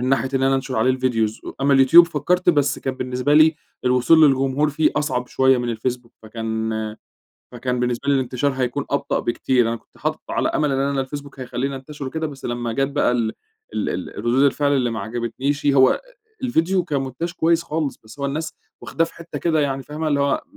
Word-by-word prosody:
مِن 125 - -1
ناحية 130 -1 +1
إن 130 - +1
أنا 135 0 +3
أنشر 130 -1 -2
عليه 130 +4 +2
الvideos. 115 -4 -1
أمّا 140 +1 +3
اليوتيوب 135 +6 +8
فكرت 175 +3 +1
بس 145 -3 +1
كان 135 - -3
بالنسبة 130 +3 -1
لي 155 +1 +6 0.3
الوصول 125 +5 +4
للجمهور 135 +2 +2
فيه 155 +2 +2
أصعب 130 -4 -1
شويّة 130 0 +3
مِن 120 0 -2
الفيسبوك 120 +1 -3
فكان 110 0 -3 0.8
فكان 125 0 -2
بالنسبة 125 +2 -2
لي 140 - +4
الإنتشار 130 +1 0
هيكون 130 +1 -2
أبطأ 140 0 0
بكتير. 120 0 +1
أنا 115 - -1
كنت - - -21
حاطه - - -2
على - - 0
أمل 150 -2 0
إن 135 +1 0
الفيسبوك 140 0 -5
هيخليني 130 +2 -3
انتشر 140 +2 -8
وكده، 160 +4 -3
بس 140 -3 -10
لمّا 120 -1 -3
جات 135 +3 0
بقى 140 -3 +1
ال 115 -2 0 0.4
ال - - -1
ال - - -4
الردود 120 +3 +1
الفعل 145 +1 +2
اللي 125 -3 +1
ما 110 -2 -4
عجبتنيشِ، 120 +7 -3
هو 135 -2 +6
أ - - 0 0.4
الفيديو 185 -7 +1
كمونتاج 140 +2 -3
كويّس 170 -1 +2
خالص، 155 -3 -3
بس 110 +5 -14
هو 140 - -2
الناس 155 +3 -4 0.3
واخداه 165 - 0
في 165 - -11
حتّة 170 0 -7
كده 160 -3 +1
يعني 135 -2 -1
فاهمة، 155 +3 -4
اللي 145 -1 +1
هو 140 0 +1
135 Hz, 200 wpm, -21 LUFS, 125-145 Hz, 0.8 s, اليوتيوب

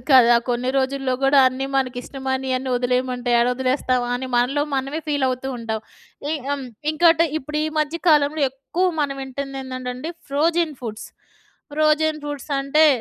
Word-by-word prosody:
కదా! 240 -2 +7
కొన్ని 245 +1 0
రోజుల్లో 265 0 -1
గూడా 275 +1 +5
అన్నీ 265 +1 -4
మనకిష్టమైనయన్నీ 265 0 -2
వదిలేయమంటే 250 0 -1
ఏడొదిలేస్తాం 255 0 +1
అని 260 +1 -3
మనలో 270 +4 +2
మనమే 275 +4 -2
ఫీలవుతూ 265 -2 0
ఉంటాం. 220 -1 -3 0.5
ఎ - - 0 0.2
హ్మ్. 280 -2 -2 0.3
ఇంకోటి 330 +1 +5
ఇప్పుడు 300 +2 -4
ఈ - - 0
మధ్య 305 +2 0
కాలంలో 300 0 +4
ఎక్కువ 275 +8 -2
మన 285 -2 +1
వింటుందేందంటండి 265 +1 -5 0.2
ఫ్రోజెన్ 320 +2 +1
ఫుడ్స్. 220 -2 -6 0.6
ఫ్రోజెన్ 310 0 +2
ఫుడ్స్ 290 0 -6
అంటే 300 +3 +4
270 Hz, 130 wpm, -22 LUFS, 255-295 Hz, 0.6 s, కదా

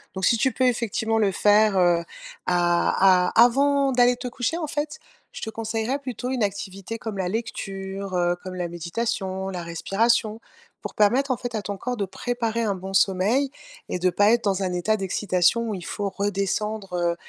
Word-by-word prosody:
donc, 190 - -1
si - - +4
tu 260 +4 +2
peux 260 - -1
effectivement, 225 -2 0
le 205 -3 +2
faire, 210 +2 +4
heu, 175 -2 +3 0.4
a 180 +1 +3
a 230 - +9
avant 275 +3 +3
d'aller 245 -1 +4
te 250 +1 -6
coucher, 245 +6 -2
en 340 - -2
fait, 295 0 -3 0.3
je - - -8
te 220 - -4
conseillerais 225 +4 -2
plutôt 255 -2 -5
une 260 -2 -2
activité 200 +1 -3
comme 220 -3 -6
la 185 - 0
lecture, 195 -3 -4
heu, 175 0 +2
comme 185 0 -7
la 180 -1 -2
méditation, 190 +2 -3
la 180 -2 -4
respiration. 215 +6 0 0.4
Pour - - -6
permettre 250 +7 +3
en 255 - 0
fait, 245 -1 -6
à 215 - -1
ton 205 0 -4
corps 245 +5 -4
de 200 - -1
préparer 230 +3 -2
un 210 -3 +1
bon 190 +1 -7
sommeil 200 +9 +2 0.4
et - - -2
de 185 +1 +3
pas 205 +4 +3
être 235 0 +2
dans 195 -1 +1
un 185 - -1
état 180 +5 +1
d'excitation 195 +2 +1
où - - -2
il 180 -3 -8
faut 205 -1 -3
redescendre, 200 0 -2
heu, 175 -1 0
205 Hz, 195 wpm, -24 LUFS, 190-235 Hz, 0.4 s, a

